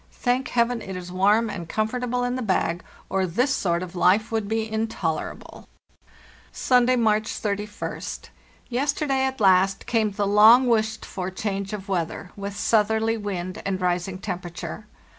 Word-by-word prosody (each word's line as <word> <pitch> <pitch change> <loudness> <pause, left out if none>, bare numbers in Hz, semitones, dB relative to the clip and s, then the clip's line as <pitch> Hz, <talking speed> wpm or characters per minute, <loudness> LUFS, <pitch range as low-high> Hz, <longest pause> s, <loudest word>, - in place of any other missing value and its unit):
Thank 250 +1 0
Heaven, 235 0 +1
it 190 -2 -6
is 180 -1 -7
warm 205 +5 +3
and 175 -6 -6
comfortable 245 +3 -1
in 245 0 -1
the 255 - -3
bag, 180 -5 0 0.2
or 190 -1 0
this 245 +10 +1
sort 175 -6 0
of 185 0 -9
life 200 +6 +3
would 220 -2 -1
be 220 +1 -1
intolerable! 220 -8 -4 0.8
"Sunday, 250 0 +3
March 215 -2 +2
31st. 210 -1 -4 0.4
Yesterday, 270 +1 0
at 265 -1 -3
last, 195 -1 +3
came 225 -2 +1
the 205 0 -2
long 215 +5 +7
wished 220 -2 +1
for 185 -2 -4
change 195 0 -3
of 205 -2 -6
weather, 180 -1 -3
with 200 0 -6
southerly 220 +1 +2
wind 200 -2 -4
and 190 -1 -2
rising 180 +1 -1
temperature. 180 +2 -6
210 Hz, 150 wpm, -24 LUFS, 185-230 Hz, 0.8 s, long